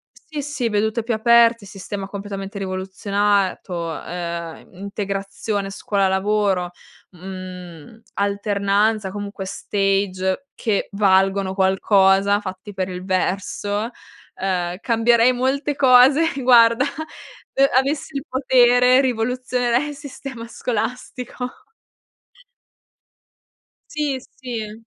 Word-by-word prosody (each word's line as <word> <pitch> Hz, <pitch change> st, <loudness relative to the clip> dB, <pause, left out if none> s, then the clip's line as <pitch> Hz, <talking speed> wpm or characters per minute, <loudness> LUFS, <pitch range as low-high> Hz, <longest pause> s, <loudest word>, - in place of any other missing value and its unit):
Sì, 300 Hz, -2 st, -7 dB
sì, 275 Hz, -4 st, -2 dB
vedute 220 Hz, +2 st, 0 dB
più 230 Hz, 0 st, -1 dB
aperte, 230 Hz, -1 st, +4 dB
sistema 195 Hz, 0 st, -6 dB
completamente 200 Hz, 0 st, -6 dB
rivoluzionato, 190 Hz, -2 st, -1 dB
ehm, 170 Hz, 0 st, -6 dB
integrazione 200 Hz, +1 st, -4 dB
scuola-lavoro, 195 Hz, -1 st, 0 dB, 0.4 s
mhmm, 185 Hz, 0 st, -10 dB
alternanza, 200 Hz, 0 st, 0 dB
comunque 200 Hz, -1 st, -6 dB
stage 195 Hz, +3 st, -1 dB
che 215 Hz, -4 st, -1 dB
valgono 195 Hz, -1 st, +2 dB
qualcosa, 195 Hz, +1 st, +3 dB
fatti 190 Hz, +1 st, -8 dB
per 190 Hz, -1 st, -3 dB
il 180 Hz, 0 st, -6 dB
verso 205 Hz, +3 st, -1 dB, 0.4 s
ehm, 180 Hz, -2 st, -2 dB
cambierei 235 Hz, +1 st, +3 dB
molte 270 Hz, +4 st, 0 dB
cose, 270 Hz, +5 st, +5 dB
guarda, 235 Hz, 0 st, +6 dB, 0.7 s
e 275 Hz, 0 st, +4 dB
avessi 275 Hz, +2 st, 0 dB
il 275 Hz, -, -3 dB
potere, 255 Hz, -1 st, +4 dB
rivoluzionerei 250 Hz, +1 st, 0 dB
il 290 Hz, -, -7 dB
sistema 270 Hz, -4 st, -8 dB
scolastico. 250 Hz, -, -5 dB, 2.3 s
Sì, 290 Hz, -3 st, -1 dB
sì. 230 Hz, -5 st, -7 dB
205 Hz, 90 wpm, -21 LUFS, 190-245 Hz, 2.3 s, guarda